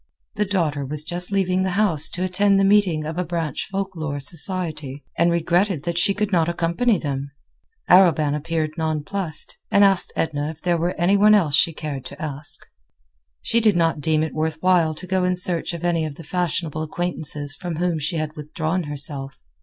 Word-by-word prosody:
The 210 0 0
daughter 165 -8 -1
was 150 +2 +1
just 175 +3 -3
leaving 185 -2 +1
the 185 -1 -1
house 170 -8 +2
to 180 - -4
attend 195 +2 +3
the - - +3
meeting 195 -6 +3
of 160 +3 -4
a - - +1
branch 165 -4 -3
Folk 195 -1 -4
Lore 155 -3 -4
Society, 155 -2 0
and 170 - +3
regretted 170 0 +1
that 170 +1 -1
she 195 +2 +2
could 210 -1 -1
not 170 -3 +2
accompany 175 +7 +1
them. 140 -3 -4 0.6
Arobin 165 -5 +5
appeared 155 +1 -2
nonplused, 155 +2 -1
and 200 - +4
asked 195 -2 +3
Edna 150 -2 -1
if 160 -1 -9
there 175 -1 0
were 175 +2 -1
any 185 +4 +2
one 210 +1 +6
else 165 -8 +2
she 145 +4 +4
cared 150 -4 -6
to 140 - -8
ask. 145 -1 -5 0.8
She 230 - +2
did 215 -4 +3
not 165 -3 +1
deem 155 0 +1
it 160 - -4
worth 155 0 -2
while 175 -4 +3
to 180 - -6
go 185 0 0
in 180 0 +1
search 175 -2 +2
of 170 -1 -7
any 170 -2 +1
of 155 -2 -5
the 165 - -11
fashionable 165 -2 -2
acquaintances 155 -3 -2
from 175 -2 -5
whom 170 0 -1
she 150 +3 -2
had 155 -1 -3
withdrawn 155 +3 -3
herself. 140 -1 -5
165 Hz, 195 wpm, -22 LUFS, 155-185 Hz, 0.8 s, one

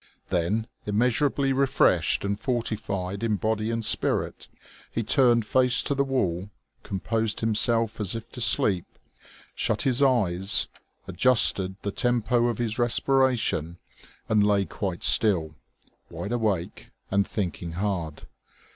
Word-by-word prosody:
Then, 95 +5 0 0.2
immeasurably 130 +5 +1
refreshed 135 -5 +2
and 100 +1 -2
fortified 105 -5 -3
in 115 -2 0
body 110 +1 -1
and 115 -1 -2
spirit, - - -1 0.4
he 115 - -2
turned 120 -1 +3
face 125 +2 +3
to - - 0
the 140 0 +1
wall, 100 -9 -2 0.3
composed 110 +3 -2
himself 115 0 +2
as 105 0 -1
if 115 0 -7
to 125 - -7
sleep, 95 -5 +2 0.7
shut - - -1
his 130 0 +1
eyes, 100 -8 +2 0.4
adjusted 100 -7 +3
the 100 - -2
tempo 120 +1 +1
of 120 -3 -2
his 120 -1 -3
respiration, 120 - +1 0.5
and 105 -2 +3
lay 100 -1 +2
quite 95 -4 -5
still, 85 -8 +3 0.6
wide 105 - -6
awake 110 -8 -2 0.2
and 100 +1 +1
thinking 90 -4 -4
hard. 90 -5 -3
110 Hz, 125 wpm, -25 LUFS, 100-120 Hz, 0.7 s, turned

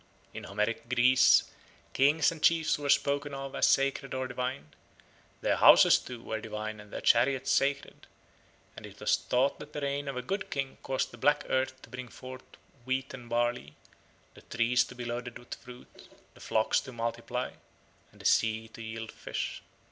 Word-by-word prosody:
In - - -7
Homeric 105 +3 -2
Greece 125 +1 +5 0.5
kings 145 +3 +4
and 160 -2 -9
chiefs 160 -2 +3
were 145 -1 -4
spoken 140 0 +1
of 135 0 -6
as - - +3
sacred 135 0 +1
or 130 0 -2
divine; 125 - -4 0.7
their - - +1
houses, - - +8
too, 120 -2 -9
were 110 -1 -4
divine 110 0 -5
and 105 -1 -13
their - - -5
chariots 130 +2 +3
sacred; 140 0 0 0.7
and - - -9
it - - -15
was - - +3
thought 130 +3 0
that 150 0 -11
the 150 - -4
reign 140 0 -2
of 135 -2 -4
a 125 - -3
good 195 +10 -3
king 135 -1 -4
caused 130 -1 -2
the 120 - -13
black 145 +4 +3
earth 130 0 0
to - - -13
bring 125 0 -7
forth 130 +2 -10 0.4
wheat 130 +1 -2
and 120 -2 -10
barley, 120 -10 -1 0.6
the - - -15
trees 120 +1 +1
to 125 - -12
be 120 -1 -6
loaded 120 0 -5
with 120 0 -9
fruit, 125 0 -13 0.3
the - - -18
flocks 110 0 +1
to 130 - -10
multiply, 115 -1 -3 0.6
and - - -16
the - - -14
sea 110 0 +2
to 115 - -11
yield 110 0 -6
fish. - - -5
125 Hz, 180 wpm, -30 LUFS, 115-135 Hz, 0.7 s, houses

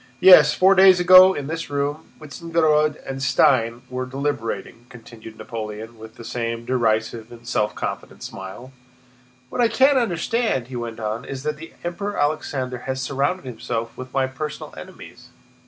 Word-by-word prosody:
"Yes. 150 -4 +8
Four 190 +1 +5
days 190 -1 +6
ago 185 +1 +8
in 145 - -4
this 165 +3 -5
room, 145 +2 -3
Wintzingerode 155 0 0
and 135 0 -6
Stein 125 -3 +2
were 130 0 -5
deliberating," 130 -3 -4
continued 115 -2 -13
Napoleon 110 0 -7
with 110 0 -12
the 115 - -11
same 115 0 -4
derisive 115 -2 -1
and 120 0 -13
self 105 -3 -1
confident - - -6
smile. 95 +7 -9 0.8
"What 245 - -2
I 235 - +5
can't 265 +4 +4
understand," 220 - -1
he 130 - -8
went 115 -2 -5
on, 110 +2 -3
"is 135 0 -7
that 150 0 -3
the 165 +2 -11
Emperor 200 +4 -4
Alexander 135 -4 -2
has 130 0 -2
surrounded 140 +6 -2
himself 115 -1 -5
with 130 0 -9
my 135 0 +1
personal 150 +3 -7
enemies. - - -12
130 Hz, 155 wpm, -22 LUFS, 115-160 Hz, 0.8 s, Yes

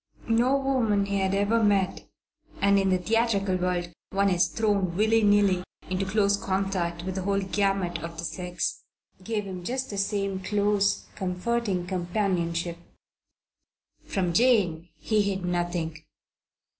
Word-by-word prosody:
No 240 +4 +3
woman 245 -7 +1
he 200 0 -1
had 190 0 +1
ever 215 +3 +2
met 200 -3 +1 0.5
and 200 0 +4
in 195 0 +1
the 185 - +3
theatrical 205 -1 +1
world 180 -1 -2 0.2
one 195 0 +2
is 175 -1 +3
thrown 190 0 0
willy 220 +2 +3
nilly 205 -3 +3 0.3
into 190 +1 -1
close 200 0 +3
contact 190 -4 -2
with 185 +1 -3
the 190 - -3
whole 195 +1 +1
gamut 195 -2 0
of 165 0 -7
the 165 - -5
sex 180 0 -3 0.4
gave 215 +1 -2
him 185 -2 -7
just 255 +5 -3
the 200 - -3
same 195 -1 -1
close, 205 +1 +1
intimate, - - -26
comforting 190 +1 -1
companionship. 175 -2 -1 1.3
From 180 -3 -1
Jane 180 -7 +3
he 215 -2 +1
hid 195 -2 -1
nothing. 175 -3 -2
195 Hz, 145 wpm, -27 LUFS, 180-205 Hz, 1.3 s, and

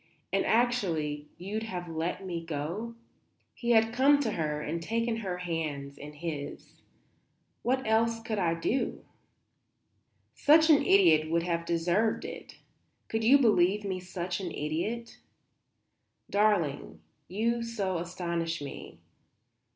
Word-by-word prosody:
And, - - +3
actually, 170 -12 +1
you'd 200 +5 -4
have 180 -6 -5
let 165 +4 -3
me 170 -2 -4
go?" 170 +9 -4 0.6
He 235 - -5
had 225 -1 +4
come 280 +3 +5
to 230 -6 0
her 150 -5 -2
and 160 +3 -3
taken 230 +5 -1
her 190 -5 -3
hands 155 -5 -4
in 145 +1 -10
his. 150 -2 -7 0.8
"What 260 +2 0
else 225 +1 +2
could 225 -2 -3
I 170 -3 +1
do?" 235 +10 -2 1.3
"Such 315 +2 +5
an 290 - +6
idiot 165 -5 +5
would 165 +1 +1
have 170 -1 -2
deserved 175 +6 +1
it? - - -8 0.5
Could 225 0 -1
you 260 +6 +7
believe 210 -5 +3
me 190 -2 -3
such 180 0 -4
an 185 -3 -4
idiot? 170 +11 -3 1.1
Darling, 175 - +1 0.3
you 230 +6 0
so 200 -6 -2
astonish 170 -1 -3
me. 145 -1 -8
180 Hz, 130 wpm, -29 LUFS, 165-225 Hz, 1.3 s, you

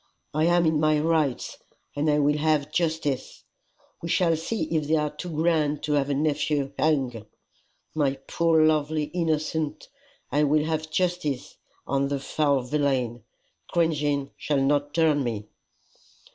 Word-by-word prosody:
I 155 +2 +2
am 175 0 +3
in 160 -1 +2
my 155 0 +3
rights, 155 -4 0 0.4
and 145 +2 +1
I 150 - +3
will 150 +1 +2
have 150 -1 +1
justice. 160 -5 -2 0.6
We 165 - -5
shall 165 -1 +3
see 165 +5 -3
if 155 -2 0
they 160 - +3
are 150 -1 -1
too 180 +4 -6
grand 155 -2 +1
to 150 - 0
have 145 -1 +1
a 140 - +1
nephew 145 -1 0
hung! 130 -8 0 0.7
My 140 -3 +1
poor 165 -2 +3
lovely 155 0 +1
innocent! 160 -2 -1 0.4
I 145 - +2
will 150 +1 +3
have 160 0 -2
justice 165 -5 -1 0.3
on 140 +1 0
the 140 0 -2
foul 140 -1 +1
villain. 125 -4 -1 0.4
Cringing 150 -4 0
shall 145 -2 0
not 145 +1 +1
turn 155 -4 +3
me." 105 -3 -4
150 Hz, 145 wpm, -25 LUFS, 140-160 Hz, 0.7 s, am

